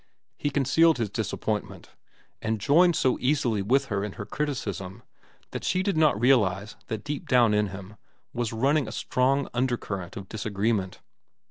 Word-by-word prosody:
He 145 - -2
concealed 145 +3 +3
his 115 -4 -2
disappointment, - - -3 0.5
and 110 -1 -1
joined 170 - +4
so 130 -3 +1
easily 125 -6 +1
with 135 +8 +2
her 100 -6 -2
in 105 -2 -4
her 100 - -7
criticism 110 -6 -4 0.5
that - - -5
she 185 - +1
did 200 -1 0
not 155 -9 +3
realize 105 -5 +2
that 110 -3 -4
deep 145 -1 -5
down 120 -4 +5
in 105 0 +2
him 100 +2 -9 0.4
was 120 -2 -2
running 135 +4 +1
a - - -6
strong 135 +3 +1
undercurrent 115 -7 -2
of 95 -2 -7
disagreement. 105 -2 -2
115 Hz, 155 wpm, -26 LUFS, 100-140 Hz, 0.5 s, down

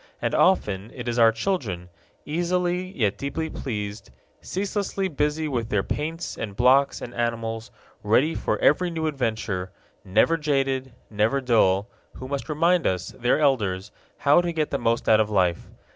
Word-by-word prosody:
And - - -1
often 105 - +2
it 120 -2 -7
is 120 0 -1
our 115 -1 +7
children 115 - -3 0.4
easily 180 +3 -1
yet 105 -5 0
deeply 160 +3 -3
pleased, 105 - -5 0.3
ceaselessly 195 0 -2
busy 150 +1 -1
with 120 -5 -2
their 105 -2 +1
paints 160 +3 -4
and 100 -3 -5
blocks 130 +4 +3
and 120 - -7
animals, 115 -1 -2 0.3
ready 125 +10 +3
for - - -1
every 180 +5 +3
new 160 -2 -3
adventure, 110 -10 -2 0.3
never 110 - +3
jaded, 135 -4 -1 0.2
never 110 +6 +1
dull 110 -6 +2 0.3
who 130 - -7
must 140 +2 -4
remind 170 +3 +2
us, 90 -1 -1
their 120 +4 0
elders, 105 -9 +1 0.3
how 145 +4 +4
to 175 -1 -2
get 155 -2 -1
the 140 - -1
most 115 -1 0
out 110 -1 +6
of 110 -1 +2
life. 90 -5 +1
130 Hz, 160 wpm, -24 LUFS, 110-155 Hz, 0.4 s, our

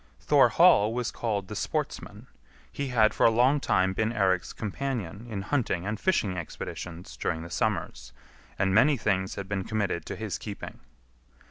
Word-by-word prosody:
Thorhall 105 +3 +5
was 125 -2 -1
called 105 -5 -2
the 105 - -7
Sportsman; - - -4 0.5
he 140 - -3
had 115 -4 +3
for - - 0
a - - +8
long 125 +6 +3
time 95 -7 +1
been 110 +3 0
Eirik's 95 -5 +1
companion 110 -2 -4
in 100 -3 -4
hunting 110 -8 -1
and 105 +1 -3
fishing 110 - +1
expeditions 85 -3 -7
during 80 +6 -2
the 85 - -10
summers, - - -2 0.5
and 95 -1 +1
many 135 +7 +5
things 95 -4 -1
had 100 - -6
been 95 -1 -2
committed 100 -5 -2
to - - -4
his 110 -3 -4
keeping. 105 -2 -8
105 Hz, 160 wpm, -27 LUFS, 95-115 Hz, 0.5 s, a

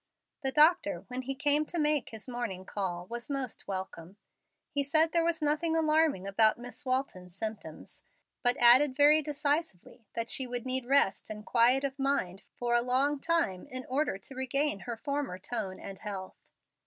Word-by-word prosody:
The 265 - 0
doctor, 300 0 +3
when 250 +1 -4
he 270 +1 -4
came 290 +2 +3
to 345 - -4
make 300 -4 +1
his 220 +1 -8
morning 235 -7 -5
call, 180 -4 -4
was 235 +6 -7
most 270 -4 -4
welcome. 190 -1 -6 0.5
He 285 -3 +1
said 315 +3 +3
there 335 -1 +2
was 330 -2 -1
nothing 310 +2 +1
alarming 310 - +2
about 215 +2 +3
Miss 245 +4 -8
Walton's 255 -10 -3
symptoms, 215 +1 -7 0.4
but 245 -1 +1
added 255 +3 +6
very 295 +2 +6
decisively 290 - -3
that 230 0 -2
she 260 - +1
would 245 0 -4
need 255 -1 -2
rest 270 -8 +2
and 210 0 -7
quiet 250 +3 +4
of 275 0 -3
mind 270 -9 -1
for 240 -1 -1
a 240 - +4
long 265 +4 +1
time 290 - 0
in 255 -2 -6
order 270 -5 -1
to 270 - -9
regain 265 -1 -1
her 235 +3 -6
former 280 -6 -3
tone 195 -1 -4
and 195 -1 -9
health. 195 -3 -6
255 Hz, 175 wpm, -30 LUFS, 215-290 Hz, 0.5 s, added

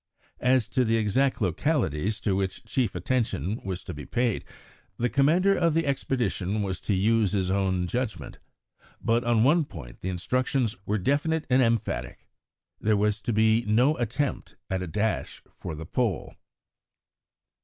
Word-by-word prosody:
As 125 -2 +3
to 130 - +2
the 115 -1 +2
exact 120 +5 +1
localities 100 - 0
to 100 - +1
which 95 -1 -2
chief 125 -7 -1
attention 105 - -1
was 95 -1 -4
to 90 - -6
be 75 -1 -7
paid, 120 -3 0 0.5
the 120 0 0
commander 165 - +4
of 170 -3 +2
the 165 - +2
expedition 120 -7 -1
was 95 -2 -3
to 105 - 0
use 105 +1 +2
his 95 -2 0
own 95 -2 +1
judgment; 120 +4 -4 0.6
but 115 +1 +1
on 115 -2 +3
one 155 +6 +4
point 75 - -10
the 95 - -3
instructions 125 +5 0
were 105 - +1
definite 150 - 0
and 130 +1 +5
emphatic 115 -3 -1 0.5
there 110 0 +2
was 105 +1 +1
to 120 - -2
be 110 +1 +3
no 125 +8 +4
attempt 125 +4 -2 0.2
at 95 -1 0
a 90 - -4
dash 105 +6 -2
for - - -7
the 80 +2 -7
Pole. 110 -1 -1
110 Hz, 155 wpm, -27 LUFS, 95-130 Hz, 0.6 s, and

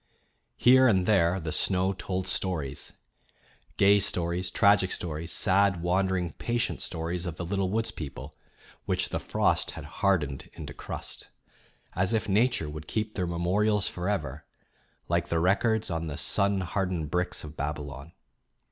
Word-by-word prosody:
Here 130 +1 +6
and 95 -6 +3
there 95 -3 +3
the 80 -2 -4
snow 95 +3 +2
told 95 0 -3
stories; 75 -8 -2 0.8
gay 100 +1 +6
stories, 90 -1 -1
tragic 100 -1 +4
stories, 80 0 -4
sad, 95 -3 +2
wandering, 90 -1 +1
patient 120 -1 -1
stories 85 +2 -3
of 85 - -4
the 85 - -5
little 95 +1 -1
woods 110 +3 0
people, 70 -4 -8 0.5
which - - 0
the - - -2
frost - - +1
had - - -7
hardened 80 -9 0
into 75 -3 -8
crust, - - -7 0.7
as 95 +4 +1
if 110 -1 0
Nature 105 -4 +2
would 75 +1 -7
keep 110 -1 -2
their 90 -2 -1
memorials 95 +5 +1
forever, 80 -6 -3 0.6
like 85 0 0
the 85 - 0
records 105 +4 +2
on 80 0 -2
the 70 - -5
sunhardened 95 -4 0
bricks 90 0 -1
of 75 0 -9
Babylon. 70 0 -5
90 Hz, 140 wpm, -28 LUFS, 80-100 Hz, 0.8 s, Here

